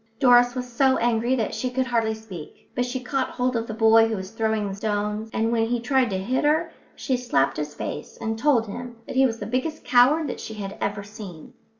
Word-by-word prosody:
Doris 245 Hz, -1 st, +5 dB
was 250 Hz, -1 st, -3 dB
so 260 Hz, +2 st, +2 dB
angry 235 Hz, +2 st, +1 dB
that 225 Hz, -4 st, -1 dB
she 255 Hz, -, -2 dB
could 260 Hz, +1 st, 0 dB
hardly 230 Hz, -3 st, 0 dB
speak, 210 Hz, -2 st, -11 dB
but 245 Hz, +1 st, -1 dB
she 260 Hz, +1 st, -3 dB
caught 260 Hz, +1 st, -2 dB
hold 250 Hz, 0 st, -1 dB
of 230 Hz, 0 st, -1 dB
the 220 Hz, -, -4 dB
boy 225 Hz, 0 st, +6 dB
who 225 Hz, -, -2 dB
was 190 Hz, 0 st, -6 dB
throwing 220 Hz, -3 st, -1 dB
stones, 210 Hz, +1 st, -2 dB
and 225 Hz, +1 st, 0 dB
when 225 Hz, -1 st, +1 dB
he 240 Hz, +1 st, 0 dB
tried 260 Hz, +1 st, +2 dB
to 190 Hz, -, -1 dB
hit 245 Hz, +10 st, -1 dB
her 315 Hz, +3 st, +2 dB, 0.2 s
she 260 Hz, -, -1 dB
slapped 145 Hz, -, +1 dB
his 150 Hz, 0 st, -4 dB
face 150 Hz, -, -6 dB
and 225 Hz, 0 st, -2 dB
told 245 Hz, -4 st, +3 dB
him 240 Hz, +3 st, -7 dB
that -, -, -7 dB
he 265 Hz, 0 st, +5 dB
was 230 Hz, -2 st, -4 dB
the 205 Hz, -, -6 dB
biggest 255 Hz, +8 st, -2 dB
coward 265 Hz, +6 st, +5 dB
that 250 Hz, -, -5 dB
she 220 Hz, -, -7 dB
had 200 Hz, -2 st, -6 dB
ever 200 Hz, 0 st, -2 dB
seen. 200 Hz, -6 st, -10 dB
230 Hz, 230 wpm, -24 LUFS, 215-255 Hz, 0.2 s, boy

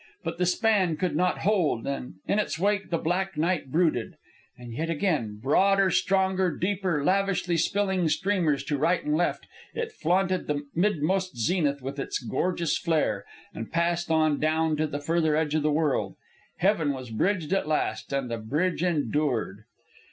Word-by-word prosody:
But -, -, -4 dB
the 180 Hz, -, +2 dB
span 185 Hz, -4 st, +2 dB
could 180 Hz, -4 st, -1 dB
not 180 Hz, +3 st, +1 dB
hold, 180 Hz, -, +1 dB
and 135 Hz, -6 st, -4 dB
in 200 Hz, -, +2 dB
its 205 Hz, -, -1 dB
wake 200 Hz, +2 st, 0 dB
the 170 Hz, -, +1 dB
black 185 Hz, +3 st, -1 dB
night 160 Hz, -4 st, 0 dB
brooded. 155 Hz, -8 st, +1 dB, 0.4 s
And 120 Hz, -1 st, -9 dB
yet 160 Hz, +7 st, -3 dB
again, 145 Hz, -, -1 dB
broader, 195 Hz, -, +3 dB
stronger, 190 Hz, -2 st, +1 dB
deeper, 185 Hz, -5 st, 0 dB
lavishly 190 Hz, -1 st, +1 dB
spilling 190 Hz, 0 st, +1 dB
streamers 170 Hz, -4 st, +1 dB
to 145 Hz, -2 st, -2 dB
right 170 Hz, +4 st, +1 dB
and 150 Hz, -, +1 dB
left, 175 Hz, +2 st, 0 dB, 0.3 s
it 465 Hz, -1 st, -3 dB
flaunted 185 Hz, -, 0 dB
the 145 Hz, -1 st, -2 dB
midmost 185 Hz, -2 st, 0 dB
zenith 145 Hz, 0 st, 0 dB
with 135 Hz, +2 st, -5 dB
its -, -, -2 dB
gorgeous 170 Hz, +6 st, -1 dB
flare, 130 Hz, -12 st, 0 dB, 0.3 s
and 115 Hz, -, -7 dB
passed 170 Hz, +1 st, 0 dB
on 160 Hz, -1 st, +3 dB
and 145 Hz, -, -2 dB
down 155 Hz, 0 st, +1 dB
to 155 Hz, +1 st, +1 dB
the 145 Hz, -, -4 dB
further 160 Hz, +1 st, +1 dB
edge 155 Hz, -1 st, 0 dB
of 155 Hz, -, +2 dB
the 150 Hz, +1 st, +1 dB
world. 150 Hz, -2 st, 0 dB, 0.4 s
Heaven 175 Hz, -6 st, +2 dB
was 130 Hz, -3 st, -8 dB
bridged 175 Hz, -, 0 dB
at 195 Hz, -, 0 dB
last, 155 Hz, -2 st, -1 dB
and 140 Hz, -2 st, -1 dB
the 115 Hz, -1 st, -4 dB
bridge 155 Hz, +11 st, -1 dB
endured! 145 Hz, -, -1 dB
165 Hz, 170 wpm, -27 LUFS, 145-185 Hz, 0.4 s, broader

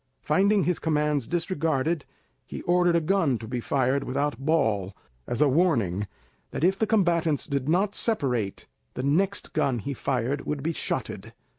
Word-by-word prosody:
Finding 195 Hz, +6 st, +3 dB
his 180 Hz, -1 st, 0 dB
commands 150 Hz, -4 st, 0 dB
disregarded, 160 Hz, -3 st, -1 dB, 0.4 s
he -, -, -7 dB
ordered 175 Hz, -1 st, +3 dB
a -, -, +5 dB
gun 165 Hz, -6 st, +1 dB
to 110 Hz, -, -9 dB
be 125 Hz, +2 st, -3 dB
fired 135 Hz, +2 st, +1 dB
without 140 Hz, +2 st, -2 dB
ball, 110 Hz, -, 0 dB, 0.3 s
as 120 Hz, -, -2 dB
a -, -, +4 dB
warning 115 Hz, -, +1 dB, 0.4 s
that -, -, -4 dB
if 190 Hz, +2 st, +3 dB
the 220 Hz, -, +1 dB
combatants 170 Hz, -8 st, +2 dB
did 140 Hz, -1 st, -2 dB
not 195 Hz, +5 st, +2 dB
separate, 125 Hz, -, 0 dB, 0.3 s
the 125 Hz, -, -3 dB
next 185 Hz, +8 st, 0 dB
gun 140 Hz, -5 st, +1 dB
he 140 Hz, +6 st, -4 dB
fired 135 Hz, +1 st, -1 dB
would 145 Hz, -2 st, -2 dB
be 165 Hz, +2 st, 0 dB
shotted. -, -, -4 dB
150 Hz, 160 wpm, -26 LUFS, 130-175 Hz, 0.4 s, a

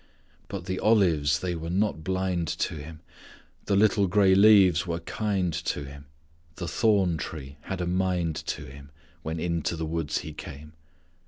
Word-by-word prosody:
But 95 Hz, -3 st, -6 dB
the 95 Hz, 0 st, -3 dB
olives 85 Hz, -10 st, +3 dB
they 90 Hz, -1 st, -2 dB
were 85 Hz, 0 st, -5 dB
not 95 Hz, -3 st, 0 dB
blind 95 Hz, -2 st, -1 dB
to -, -, -2 dB
Him, 75 Hz, +2 st, -9 dB, 0.6 s
The 100 Hz, -, +1 dB
little 100 Hz, -1 st, +4 dB
gray 95 Hz, +1 st, +4 dB
leaves 95 Hz, -4 st, +6 dB
were 85 Hz, 0 st, -2 dB
kind 100 Hz, -5 st, -1 dB
to 75 Hz, -, -3 dB
Him; 70 Hz, +1 st, -11 dB, 0.5 s
The 85 Hz, -, -5 dB
thorn 100 Hz, -7 st, +2 dB
tree 70 Hz, -3 st, -7 dB
had 95 Hz, -2 st, -4 dB
a -, -, -1 dB
mind 90 Hz, -3 st, 0 dB
to -, -, -3 dB
Him 70 Hz, +1 st, -12 dB, 0.3 s
When 80 Hz, +1 st, -4 dB
into 85 Hz, 0 st, -1 dB
the 80 Hz, 0 st, -3 dB
woods 80 Hz, -1 st, -2 dB
He 75 Hz, -, -8 dB
came. 75 Hz, +2 st, -10 dB
85 Hz, 165 wpm, -27 LUFS, 80-95 Hz, 0.6 s, leaves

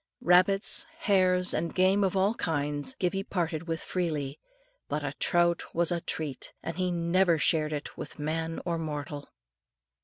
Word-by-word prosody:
Rabbits, 185 Hz, +3 st, +3 dB
hares, 185 Hz, -2 st, +4 dB
and 165 Hz, +1 st, -2 dB
game 190 Hz, +2 st, +3 dB
of 190 Hz, 0 st, +1 dB
all 195 Hz, +3 st, +3 dB
kinds, 145 Hz, -, -1 dB
Gibbie 195 Hz, -4 st, -1 dB
parted 170 Hz, -4 st, -3 dB
with 165 Hz, 0 st, -2 dB
freely; 150 Hz, -6 st, -2 dB, 0.5 s
but -, -, -2 dB
a -, -, -3 dB
trout 175 Hz, -1 st, +2 dB
was 170 Hz, 0 st, +2 dB
a 170 Hz, -1 st, -1 dB
treat, 150 Hz, -5 st, -5 dB
and 165 Hz, -, -4 dB
he 185 Hz, 0 st, 0 dB
never 170 Hz, 0 st, +2 dB
shared 155 Hz, 0 st, +2 dB
it 150 Hz, -1 st, -5 dB
with -, -, -7 dB
man 160 Hz, +2 st, -2 dB
or 170 Hz, -2 st, -1 dB
mortal. 150 Hz, -2 st, -5 dB
170 Hz, 155 wpm, -28 LUFS, 155-185 Hz, 0.5 s, hares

